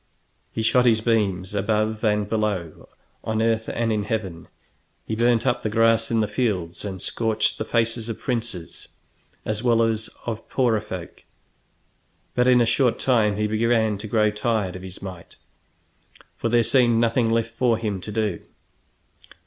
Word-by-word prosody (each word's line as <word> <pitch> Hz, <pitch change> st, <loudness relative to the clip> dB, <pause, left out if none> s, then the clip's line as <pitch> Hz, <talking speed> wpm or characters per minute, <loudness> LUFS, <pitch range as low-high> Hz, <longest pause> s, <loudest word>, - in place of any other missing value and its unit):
He 110 Hz, -, -3 dB
shot 125 Hz, +2 st, +4 dB
his 110 Hz, -2 st, +4 dB
beams 105 Hz, -5 st, 0 dB
above 110 Hz, +2 st, 0 dB
and 105 Hz, -2 st, +1 dB
below, 105 Hz, -7 st, -2 dB, 0.3 s
on 110 Hz, 0 st, -1 dB
earth 115 Hz, 0 st, +1 dB
and 115 Hz, -1 st, 0 dB
in 105 Hz, -1 st, -1 dB
heaven; 95 Hz, -7 st, -4 dB, 0.6 s
he -, -, -4 dB
burnt 120 Hz, +1 st, +2 dB
up 125 Hz, -2 st, +1 dB
the 110 Hz, -, -2 dB
grass 115 Hz, +1 st, +3 dB
in 115 Hz, -1 st, +2 dB
the 105 Hz, -, 0 dB
fields 90 Hz, -10 st, -2 dB
and 95 Hz, -2 st, -5 dB
scorched 110 Hz, +3 st, 0 dB
the 110 Hz, -, -2 dB
faces 115 Hz, 0 st, 0 dB
of 115 Hz, -, -4 dB
princes 115 Hz, -, -4 dB, 0.6 s
as 110 Hz, 0 st, -2 dB
well 115 Hz, -2 st, +3 dB
as 110 Hz, -1 st, -1 dB, 0.2 s
of 115 Hz, -1 st, -5 dB
poorer 120 Hz, -5 st, +1 dB
folk. 95 Hz, -5 st, -8 dB, 1.1 s
But 125 Hz, 0 st, +2 dB
in 125 Hz, -1 st, +6 dB
a -, -, +4 dB
short 120 Hz, +1 st, +2 dB
time 110 Hz, -6 st, +2 dB
he 105 Hz, -, 0 dB
began 110 Hz, -1 st, +1 dB
to 110 Hz, -, -6 dB
grow 105 Hz, -1 st, +2 dB
tired 105 Hz, -4 st, -1 dB
of 95 Hz, -, -7 dB
his 95 Hz, 0 st, -9 dB
might, 90 Hz, -3 st, -9 dB, 1.0 s
for 115 Hz, -, -2 dB
there 120 Hz, 0 st, +4 dB
seemed 120 Hz, -2 st, +3 dB
nothing 115 Hz, 0 st, +2 dB
left 115 Hz, 0 st, 0 dB
for 115 Hz, -1 st, +2 dB
him 105 Hz, -4 st, -3 dB
to 105 Hz, -, -7 dB
do. 105 Hz, -4 st, -1 dB
110 Hz, 165 wpm, -23 LUFS, 105-115 Hz, 1.1 s, in